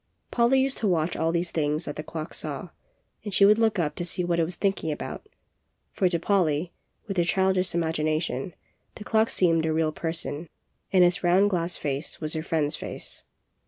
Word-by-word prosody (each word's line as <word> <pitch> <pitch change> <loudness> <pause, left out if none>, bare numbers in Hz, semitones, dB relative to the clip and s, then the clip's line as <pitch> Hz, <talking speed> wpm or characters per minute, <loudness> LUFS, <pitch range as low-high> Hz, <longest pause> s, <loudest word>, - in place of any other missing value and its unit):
Polly 245 +3 +3
used 270 0 0
to 220 - 0
watch 170 -2 +1
all 160 0 +1
these 170 +1 -1
things 150 -1 -1
that - - -5
the - - -4
clock 155 0 -6
saw, - - -4 0.5
and 205 - -5
she 200 +1 +6
would 210 +2 +5
look 220 -2 +2
up 160 -4 0
to - - -2
see 180 +1 -1
what 170 -1 0
it - - +4
was 175 +1 -6
thinking 195 -5 0
about; 425 - -6 0.6
for 185 - +1
to 175 - +1
Polly, 170 -3 +1 0.3
with 195 -4 -5
her 175 - +4
childish 190 0 +1
imagination, 155 -2 -1 0.4
the 210 - -8
clock 220 +1 +2
seemed 165 -3 +3
a 160 - 0
real 160 0 +1
person, 160 -1 -4 0.4
and 185 -2 +6
its 180 +2 +2
round 190 +4 +4
glass 170 -1 -1
face 140 +1 -1
was 155 -1 -2
her 160 - -2
friend's 155 -2 0
face. - - -7
170 Hz, 195 wpm, -26 LUFS, 160-190 Hz, 0.6 s, she